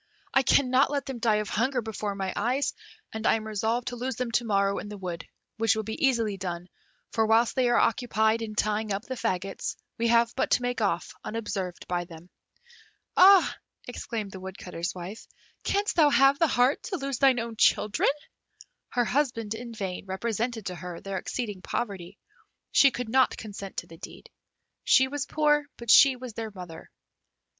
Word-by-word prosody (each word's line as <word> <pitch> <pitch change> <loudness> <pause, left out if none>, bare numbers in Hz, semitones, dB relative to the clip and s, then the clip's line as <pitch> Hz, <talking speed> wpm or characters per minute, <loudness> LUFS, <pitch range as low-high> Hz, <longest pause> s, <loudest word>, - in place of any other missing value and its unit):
I 270 - +5
cannot 260 0 +3
let 280 -2 -2
them 265 -3 -6
die 225 -2 +2
of 210 -2 -1
hunger 250 +4 0
before 215 -3 -4
my 190 -1 -3
eyes, 250 +6 0 0.4
and 220 0 -2
I - - +5
am 220 -1 -4
resolved 220 +3 -1
to 245 - -6
lose 250 +1 -3
them 250 0 -3
to 240 - +1
morrow 200 -2 +1
in 205 - -7
the 210 - -7
wood, 175 -3 -6 0.3
which 225 -1 +2
will 220 - -2
be 220 +5 -5
easily 225 -6 0
done, 180 -1 -5 0.4
for 220 -1 +1
whilst 225 +1 +3
they 255 -2 +2
are 240 - +3
occupied 225 -2 +2
in 215 -1 -5
tying 215 0 0
up 195 +2 -2
the 260 - -5
faggots, 195 -6 -3 0.2
we 235 - +2
have 235 0 +3
but 265 - 0
to 245 - +2
make 245 -1 -2
off 200 -4 0
unobserved 195 -5 -4
by 175 -1 -1
them." 170 +1 -13 0.8
"Ah!" 380 0 +7 0.3
exclaimed 225 -4 -5
the 190 - -8
Woodcutter's 185 -2 -6
wife, 185 +5 -8 0.4
"Canst 405 +1 0
thou 305 -3 +6
have 275 +1 +4
the 330 - +4
heart 250 0 +2
to 380 - -3
lose 275 -4 -3
thine 265 -3 +4
own 230 0 -5
children?" 210 -1 +3 0.8
Her 245 -2 +1
husband 240 -5 0
in 235 +1 -7
vain 195 -4 -5
represented 225 +3 -2
to 180 - -4
her 180 -1 -7
their 195 -1 -4
exceeding 210 -5 -4
poverty; 195 -3 -4 0.5
she 275 - +6
could 250 -2 -5
not 260 +3 +3
consent 200 -2 -8
to - - -3
the 165 - -14
deed. - - -11 0.5
She 265 - +5
was 285 0 -4
poor, 295 -1 +2
but 235 -1 0
she 275 -2 +8
was 250 -2 -8
their 225 0 -5
mother. 180 -5 -10
225 Hz, 185 wpm, -27 LUFS, 200-250 Hz, 0.8 s, she